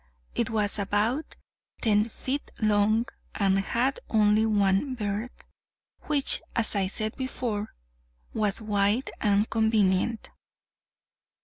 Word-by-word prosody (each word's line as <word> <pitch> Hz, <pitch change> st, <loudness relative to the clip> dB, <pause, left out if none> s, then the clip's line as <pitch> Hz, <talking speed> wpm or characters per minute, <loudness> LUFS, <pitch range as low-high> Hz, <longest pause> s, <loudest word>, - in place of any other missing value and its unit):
It 230 Hz, -1 st, -1 dB
was 215 Hz, -1 st, 0 dB
about 210 Hz, +9 st, -1 dB, 0.4 s
ten 215 Hz, -1 st, +2 dB
feet 270 Hz, +5 st, -4 dB
long, 215 Hz, +1 st, +2 dB, 0.3 s
and 195 Hz, -2 st, +2 dB
had 240 Hz, +7 st, 0 dB
only 215 Hz, 0 st, +3 dB
one 205 Hz, +5 st, +1 dB
berth, 210 Hz, +2 st, -4 dB, 0.6 s
which, 290 Hz, -2 st, +2 dB
as 230 Hz, -2 st, +3 dB
I 195 Hz, -2 st, +1 dB
said 215 Hz, +2 st, -3 dB
before, 240 Hz, -5 st, -4 dB, 0.6 s
was 210 Hz, -3 st, +3 dB
wide 210 Hz, +3 st, +1 dB
and 205 Hz, 0 st, +2 dB
convenient. 220 Hz, -1 st, +1 dB
215 Hz, 105 wpm, -27 LUFS, 205-230 Hz, 0.6 s, only